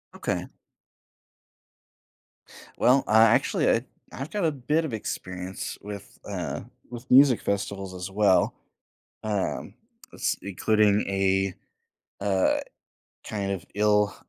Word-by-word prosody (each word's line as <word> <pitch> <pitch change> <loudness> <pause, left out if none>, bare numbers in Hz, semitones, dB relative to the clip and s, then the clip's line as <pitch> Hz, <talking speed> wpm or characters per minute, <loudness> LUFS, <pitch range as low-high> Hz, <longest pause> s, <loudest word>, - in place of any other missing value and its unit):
Okay. - - -2 2.3
Well, 130 +2 +4
I 110 +1 +6
actually, 110 - +3
I - - +2 0.3
I've 135 +3 -5
got 205 -5 0
a 160 - +3
bit 150 +4 0
of 135 - -5
experience 95 -3 -5
with, 100 -1 -9
uh, - - -4 0.3
with 120 +1 -9
music 130 -2 +7
festivals 100 -1 -3
as 90 +1 -6
well, 100 -1 +3 0.7
um, 105 -3 -2 0.4
s - - 0
including 105 +1 +2
a, 95 -1 +1 0.7
uh, 95 -2 +2 0.7
kind 100 -2 -2
of 95 -1 -4
ill 105 0 +3
105 Hz, 110 wpm, -26 LUFS, 95-115 Hz, 2.3 s, music